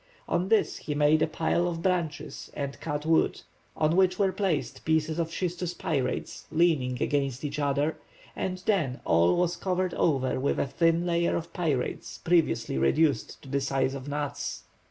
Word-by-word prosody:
On 180 +2 0
this 225 - +2
he 150 - -4
made 150 +1 +4
a - - +3
pile 160 +2 0
of 165 -1 -4
branches 175 -5 -2
and 140 -1 -4
cut 150 -1 -3
wood, 160 0 +2 0.4
on 155 +1 +2
which 185 -1 +3
were 195 -2 +2
placed 185 -7 -2
pieces 160 +1 +1
of 165 -1 0
schistous 175 0 -3
pyrites 135 -5 -2
leaning 155 -7 +2
against 140 -2 -1
each 145 +1 -3
other, 145 +2 0 0.4
and 185 0 -3
then 155 -12 +1
all 85 +2 +4
was 175 0 +1
covered 185 -1 -1
over 130 -5 +1
with 140 - 0
a - - +1
thin 165 +5 +2
layer 170 -1 +1
of 170 - -4
pyrites 155 -8 -2
previously 165 - +1
reduced 140 - +2
to - - -12
the 140 +1 0
size 135 -1 0
of 135 0 -7
nuts. 145 -1 -3
155 Hz, 170 wpm, -28 LUFS, 140-175 Hz, 0.4 s, made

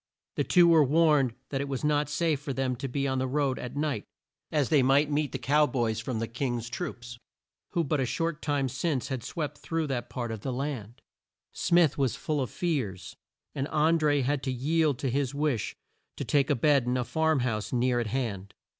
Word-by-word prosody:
The - - +1
two 175 -2 +5
were 165 -2 +6
warned 145 -4 +3
that 135 -1 -2
it 140 - -3
was 135 0 -4
not 150 0 +1
safe 150 0 +1
for 145 -1 -4
them 130 -1 -1
to 135 - -4
be 140 +2 -1
on 130 -1 0
the 130 - 0
road 135 -1 0
at 125 +2 -6
night, 145 -1 -1 0.5
as 150 -4 +1
they 150 -4 +5
might 140 +3 +3
meet 145 0 0
the - - -3
Cow 145 +5 +3
Boys 115 -5 -1
from 120 0 -3
the 115 +1 -2
King's 120 -1 -3
troops, 120 -8 -6 0.5
who 170 - +2
but 150 0 0
a 130 - +1
short 165 +3 -2
time 145 -2 0
since 135 +1 -2
had 130 -4 -3
swept 150 -3 -4
through 165 -1 -2
that 120 -4 -3
part 120 -1 -4
of 110 -2 -5
the 130 - -3
land. 125 -4 -4 0.5
Smith 170 -5 +3
was 135 -4 +1
full 150 -2 -2
of 130 - -2
fears, 110 - -3 0.4
and 135 0 -2
An 160 +2 +3
dré 145 -3 +2
had 140 +1 0
to 130 -1 -2
yield 150 +2 +1
to 135 - -2
his 140 +1 -1
wish 145 -8 -1 0.4
to - - -3
take 140 0 +2
a 145 - +3
bed 140 0 +3
in 125 +1 +1
a 125 - 0
farm 160 +1 +1
house 110 -4 -2
near 125 0 +2
at 120 - -1
hand. 105 -6 -3
135 Hz, 215 wpm, -28 LUFS, 125-150 Hz, 0.5 s, were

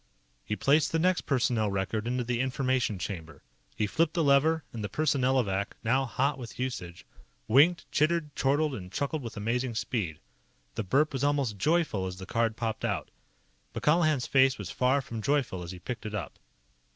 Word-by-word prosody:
He 105 - -3
placed 150 +6 +3
the 165 - +1
next 180 +2 +1
personnel 120 -5 +1
record 100 +3 -2
into 125 +1 0
the 120 0 -1
Information 130 -4 0
chamber. 80 -5 -6 0.3
He 105 - 0
flipped 160 - 0
the 170 - +2
lever, 150 +3 +4
and 110 -2 -5
the 105 - -3
Personnelovac, 125 -7 +1
now 130 +4 +2
hot 135 +3 0
with 120 -2 -8
usage, 115 -10 -5 0.4
winked, 150 +10 +5
chittered, 155 -1 +1
chortled, 145 +2 +1
and 90 -7 -7
chuckled 145 +5 -2
with 115 -3 -7
amazing 115 +3 -1
speed. 100 -9 -2 0.6
The - - -2
burp 140 +10 +2
was 135 0 -2
almost 140 -8 0
joyful 150 - +1
as 90 0 -6
the 95 - -8
card 115 +2 0
popped 115 -2 -3
out. - - -2 0.6
But - - -5
Colihan's 155 -4 +3
face 135 -1 +4
was - - -6
far 135 +1 +2
from 115 -2 -6
joyful 130 -8 0
as 85 - -7
he 90 - -7
picked 110 +5 -6
it 105 - -5
up. 95 -8 -6
125 Hz, 180 wpm, -29 LUFS, 105-145 Hz, 0.6 s, winked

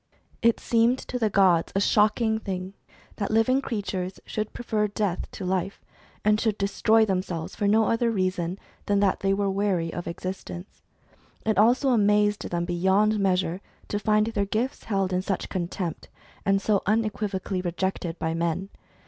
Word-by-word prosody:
It 230 -1 +3
seemed 235 +2 +2
to 250 -1 -5
the 220 -2 +2
gods 185 -4 +3
a - - +3
shocking 215 +2 +2
thing 190 -2 -5 0.4
that 200 - -2
living 225 +5 +3
crea 225 -6 -3
tures 185 -1 -4
should 215 0 -3
prefer 215 -3 -1
death 205 -3 -2
to 190 - -6
life, 185 +1 -1 0.5
and 210 0 +4
should 220 -2 0
destroy 220 +3 +3
them 190 -3 +1
selves 170 -4 -6
for 205 - 0
no 220 +2 +4
other 230 +1 +1
reason 185 -4 -1 0.3
than 205 0 +2
that 195 -2 +2
they 195 - +1
were 200 0 +1
weary 190 -4 0
of 175 - -5
existence. 185 +1 -7 0.6
It 215 -2 +2
also 245 +5 +4
amazed 210 -3 +2
them 175 0 -1
beyond 190 +5 +2
measure 185 -2 +1 0.3
to 205 - -1
find 215 0 +2
their 220 -3 -1
gifts 230 +7 -2
held 195 -3 0
in 180 - +1
such 195 0 -3
contempt, 175 -2 -4 0.4
and 195 0 +4
so 200 0 +1
unequivocally 205 -3 -1
rejected 175 -1 -2
by 160 0 -2
men. 170 +3 -1
200 Hz, 165 wpm, -26 LUFS, 185-215 Hz, 0.6 s, and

